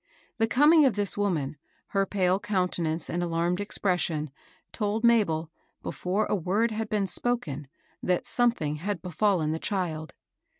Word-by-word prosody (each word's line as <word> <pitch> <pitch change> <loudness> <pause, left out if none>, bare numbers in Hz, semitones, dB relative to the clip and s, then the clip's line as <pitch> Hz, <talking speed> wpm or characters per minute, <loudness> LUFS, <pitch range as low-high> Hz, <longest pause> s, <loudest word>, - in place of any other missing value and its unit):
The 225 - +3
coming 300 +6 +6
of 260 -7 +3
this 205 -2 +2
woman, 160 -8 -1 0.3
her 195 -1 +1
pale 185 -1 +1
counte 185 -4 -1
nance 160 -1 -1
and 175 - -2
alarmed 175 +2 0
expression, 175 -7 -1 0.4
told 210 +1 -2
Mabel, 170 -9 +3 0.3
before 190 +4 -1
a - - 0
word 205 +6 +1
had 220 0 -3
been 210 -3 +1
spoken, 180 - 0 0.3
that 180 -1 0
something 230 -12 +1
had 185 +2 -4
be 180 - -6
fallen 180 -5 +1
the 160 - -2
child. 165 -6 -3
185 Hz, 155 wpm, -27 LUFS, 165-210 Hz, 0.4 s, coming